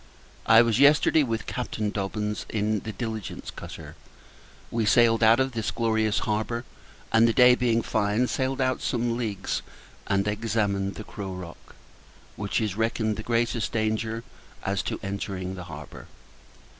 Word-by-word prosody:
I 115 +1 +8
was 115 0 +1
yesterday 150 +2 +5
with 115 -5 -2
Captain 110 -4 -3
Dobbins, 105 +1 -3
in 105 0 0
the 110 - -6
Diligence 110 -2 -5
cutter. - - -9 0.8
We 115 -1 0
sailed 115 +1 +4
out 115 +2 +6
of 130 0 +1
this 115 -3 -2
glorious 110 -2 +1
harbour; 110 +3 -1 0.5
and, 115 +1 +5
the 115 - +2
day 125 0 +7
being 120 -2 +1
fine, 105 +3 +1
sailed 130 +1 -1
out 130 -1 +1
some 120 -1 0
leagues, 110 -5 -2 0.5
and 100 0 +1
examined 105 -2 -1
the 110 - -7
Crow 95 -3 -6
Rock, 90 -3 -10 0.6
which 100 -1 -1
is 105 -4 -1
reckoned 110 -1 0
the 110 - -5
greatest 115 0 0
danger 110 +1 -1 0.4
as 100 0 0
to 90 - -4
entering 95 -2 -4
the 90 -2 -7
harbour. 75 -3 -10
110 Hz, 150 wpm, -26 LUFS, 105-115 Hz, 0.8 s, I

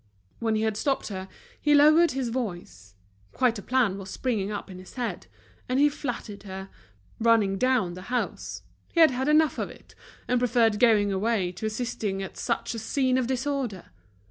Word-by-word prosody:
When 225 -1 0
he 215 - 0
had 220 -1 0
stopped 270 +1 -1
her, 190 -1 -6 0.3
he 295 0 +4
lowered 310 +3 +6
his 260 -2 -2
voice. 175 - -5 0.4
Quite 240 -4 +1
a - - -7
plan 230 -5 +1
was 195 0 -8
springing 215 -6 -2
up 205 - -5
in 185 - -9
his 185 - -13
head. 245 -2 -4 0.4
And 255 +1 +1
he 295 +1 +6
flattered 240 -8 -5
her, 190 -1 -8 0.5
running 220 -4 +3
down 250 -9 +2
the 180 - -8
house; 250 0 -3 0.3
he 335 - -1
had 320 -3 +8
had 260 +2 -2
enough 305 +1 +3
of - - -2
it, - - -15 0.3
and 250 - +2
preferred 230 -3 +2
going 210 -4 +4
away 195 -2 0
to 200 +4 -4
assisting 215 -4 -3
at 190 - -8
such 235 0 -2
a 230 - -4
scene 255 +3 +1
of 250 - -1
disorder. 260 -6 -2
230 Hz, 185 wpm, -26 LUFS, 195-255 Hz, 0.5 s, had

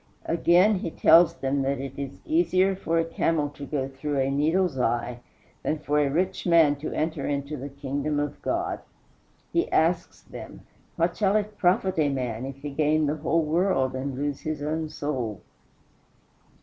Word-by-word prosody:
Again, 180 +4 +4
he 170 - -3
tells 165 +2 +5
them 135 +1 -1
that 135 +1 0
it 135 0 -6
is 140 -1 -6
easier 195 - +2
for 165 -3 -1
a 165 - +2
camel 165 -2 0
to 145 -1 -9
go 135 -2 -2
through 140 +2 -4
a 135 0 +1
needle's 155 +1 +1
eye 120 0 -1 0.4
than 155 - -1
for 150 0 0
a 145 -1 +2
rich 180 +6 -1
man 165 -4 +5
to 150 - -5
enter 155 -3 -2
into 140 +1 -2
the 140 +1 -6
kingdom 140 +1 -2
of 145 -1 -3
God. 350 +1 -1 0.7
He 340 - +1
asks 165 +3 +1
them, - - -10 0.3
What 170 +1 +1
shall 200 -1 +2
it 210 0 0
profit 185 0 +2
a 150 -2 +3
man 125 -2 -3
if 135 +1 -9
he 145 - -4
gain 155 +2 +2
the 150 +2 -1
whole 165 +2 +1
world 155 -5 +1
and 130 +1 -3
lose 145 +1 -2
his 155 -2 -4
own 155 +1 -2
soul? 125 -10 -3
150 Hz, 175 wpm, -26 LUFS, 140-170 Hz, 0.7 s, tells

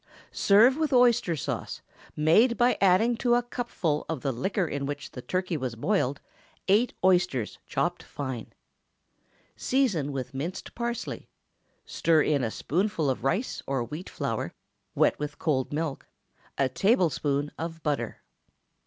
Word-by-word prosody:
Serve 225 +7 +5
with 315 -2 0
oyster 245 -8 +4
sauce, 145 - -4 0.3
made 210 +11 +4
by 245 0 +4
adding 200 +5 +4
to 240 +1 +2
a 245 - +2
cupful 235 -11 -2
of 160 -5 -3
the 135 - 0
liquor 180 - -1
in 140 -2 -3
which 145 0 -5
the 125 - -8
turkey 180 +6 -2
was 130 -5 -3
boiled, 145 - 0 0.5
eight 210 +6 +4
oysters 180 - +2
chopped - - -1
fine. 130 -5 -6 1.0
Season 205 - +1
with 130 -2 -5
minced 160 +8 -5
parsley, 235 0 -4 0.6
stir 160 -2 +2
in 145 -4 +1
a 115 - 0
spoonful 165 - 0
of 125 - -5
rice 185 - -1
or 135 -3 0
wheat 150 +10 -7
flour, - - -3 0.4
wet - - +3
with 145 -1 -4
cold 135 -5 0
milk, 150 -2 -3 0.5
a 135 - +3
tablespoonful 150 - +1
of 165 0 -5
butter. 150 -2 -2
165 Hz, 140 wpm, -27 LUFS, 140-215 Hz, 1.0 s, Serve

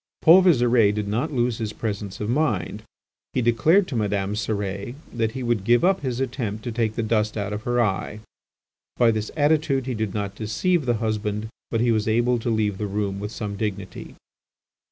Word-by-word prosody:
Paul 170 +4 +8
Visire 120 - +4
did 105 -1 -3
not 120 +10 -1
lose 120 -3 0
his 110 -2 -3
presence 105 -3 -4
of 105 - -3
mind. 120 - 0 0.5
He 130 - +1
declared 155 - +4
to 130 - -4
Madame 100 -2 -1
Cérès 105 +1 -3 0.2
that 110 -2 -1
he 130 -1 -4
would 120 -5 0
give 120 +3 +3
up 190 +1 +3
his 130 -3 -3
attempt 120 -5 -3
to 120 - -3
take 110 -1 -1
the 115 - -1
dust 110 -1 0
out 105 0 -2
of 105 - -4
her 120 0 +2
eye. 105 -1 -1 0.8
By 120 -2 +5
this 110 -1 -2
attitude 145 -3 +2
he 130 - -2
did 110 -3 -3
not 100 -2 -2
deceive 130 - 0
the 120 - +2
husband, 110 -1 -2 0.2
but 115 - 0
he 120 0 +3
was 110 -1 0
able 120 +2 +2
to 115 - -3
leave 105 -3 0
the 105 - -2
room 100 -1 -2
with 105 +1 -5
some 105 -2 -5
dignity. 100 -2 -5
110 Hz, 195 wpm, -24 LUFS, 105-120 Hz, 0.8 s, Paul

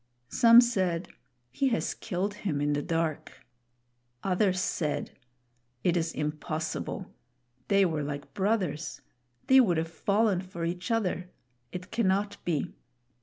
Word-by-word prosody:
Some 235 -1 +8
said, 185 -8 0 0.4
"He 275 - +1
has 235 -3 0
killed 200 0 -3
him 190 -8 -2
in 145 0 +1
the 145 - 0
dark." 165 -1 -3 0.8
Others 185 0 +2
said, 160 -4 -1 0.7
"It 175 - +2
is 165 -1 0
impossible; 155 +4 -3 0.5
they 200 -1 +4
were 160 -4 -1
like 145 0 -5
brothers; 190 -6 -1 0.4
they 265 0 +7
would 185 -10 +4
have 160 +1 0
fallen 200 +1 +1
for 175 -3 -5
each 175 +1 -3
other. 185 -6 0 0.4
It 180 +1 -7
cannot 205 -1 0
be." 160 -5 -1
180 Hz, 125 wpm, -29 LUFS, 160-205 Hz, 0.8 s, Some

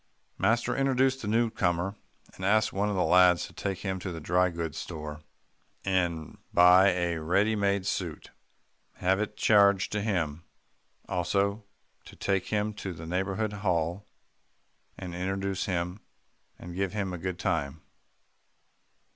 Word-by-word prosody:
Master 120 +2 +2
introduced 135 -1 +2
the 105 - -5
newcomer, 100 -5 +1 0.4
and 95 - -10
asked 110 +3 +3
one 100 +2 0
of 105 - -1
the 90 - +2
lads 90 -1 +5
to - - -13
take 95 -2 -3
him 95 -1 -2
to 90 - -5
the 85 - -6
dry 90 +3 +2
goods 85 -2 -4
store, 75 -2 -7 0.6
and 90 -5 -1
buy 90 +2 +7
a 85 -3 -1
ready 100 +7 +2
made 100 -2 +1
suit, 90 -5 -3 0.6
and - - -16
have 95 +1 +3
it 105 - -3
charged 100 -2 +4
to 105 - -1
him; 85 -7 -1 0.6
also 100 +4 0 0.4
to - - -13
take 95 -2 -1
him 105 0 -1
to 95 -4 -6
Neighbourhood 95 +5 -1
Hall, 90 +1 -1 0.9
and 90 -2 -7
introduce 95 +1 -2
him, 90 +1 -2 0.6
and 85 - -9
give 95 0 -1
him 100 -3 -2
a 90 - -5
good 90 +1 -3
time. 70 +2 -2
95 Hz, 145 wpm, -28 LUFS, 85-100 Hz, 0.9 s, buy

